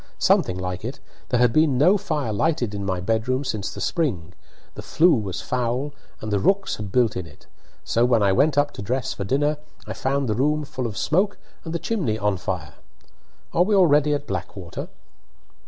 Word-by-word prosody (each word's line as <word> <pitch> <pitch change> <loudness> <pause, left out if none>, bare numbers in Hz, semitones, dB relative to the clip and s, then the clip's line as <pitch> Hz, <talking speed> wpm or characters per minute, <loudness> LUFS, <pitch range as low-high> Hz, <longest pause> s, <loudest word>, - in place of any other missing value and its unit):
"Something 90 - +2
like 90 +1 -4
it. 125 +5 -5 0.3
There 125 - +2
had 120 -2 +4
been 155 -3 +3
no 175 +9 +5
fire 155 - -2
lighted 120 -2 0
in 100 -1 -4
my 95 -2 -1
bedroom 115 +7 0
since 105 -7 -3
the - - -8
spring, 95 - -1 0.4
the - - -8
flue 170 +2 +4
was 105 -7 -2
foul, 125 +3 -1 0.3
and 110 - -4
the 100 - +2
rooks 195 - +1
had 105 -2 -6
built 120 -2 +2
in 90 -2 -4
it; 75 - -17 0.4
so 115 - +1
when 120 -3 +3
I 100 - +4
went 140 +7 +3
up 145 0 +3
to - - -8
dress 125 +5 -2
for 100 - -5
dinner 145 +6 +1 0.3
I - - -5
found 135 0 -1
the 110 - +1
room 150 +6 +1
full 130 -2 -4
of 105 - -7
smoke 190 +6 +1 0.3
and 160 - -6
the 170 - -1
chimney 165 - -1
on 105 -2 0
fire. 90 -4 -4 0.8
Are 170 - +3
we 205 +3 +3
already 150 -5 +4
at 145 0 -5
Blackwater?" 95 - -5
125 Hz, 200 wpm, -23 LUFS, 100-150 Hz, 0.8 s, no